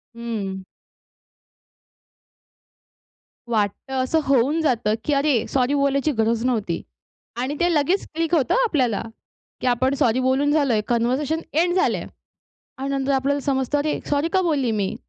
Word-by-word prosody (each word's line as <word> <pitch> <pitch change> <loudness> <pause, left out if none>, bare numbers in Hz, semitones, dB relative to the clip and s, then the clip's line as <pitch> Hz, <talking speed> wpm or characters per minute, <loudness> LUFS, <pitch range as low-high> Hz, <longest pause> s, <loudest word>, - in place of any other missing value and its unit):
हंम्म. 210 -5 -4 2.8
वाटतं, 220 +3 -2
असं 320 +5 +1
होऊन 275 +4 +2
जातं, 235 -8 +1
की 295 - +1
अरे, 280 -4 +2
सॉरी 260 +1 +1
बोलायची 280 +1 +1
गरज 225 +1 +1
नव्हती. 215 -9 -1 0.6
आणि 270 +3 -2
ते 345 0 +2
लगेच 320 +7 +1
क्लिक 330 +1 +1
होतं 265 -6 +2
आपल्याला, 260 - +1 0.6
की - - -1
आपण 255 +2 +2
सॉरी 235 +1 +3
बोलून 265 +3 +2
झालोय, 275 -8 +2
कन्व्हर्सेशन 255 +7 0
एंड 350 +4 +2
झालंय. 375 - +1 0.7
आणि 270 +1 -3
नंतर 275 0 0
आपल्याला 275 +2 +1
समजतं, 270 0 0
अरे, 300 +1 -1
सॉरी 290 +2 +1
का 380 - +3
बोलली 285 -9 +1
मी? 200 -3 -1
270 Hz, 135 wpm, -22 LUFS, 235-295 Hz, 2.8 s, सॉरी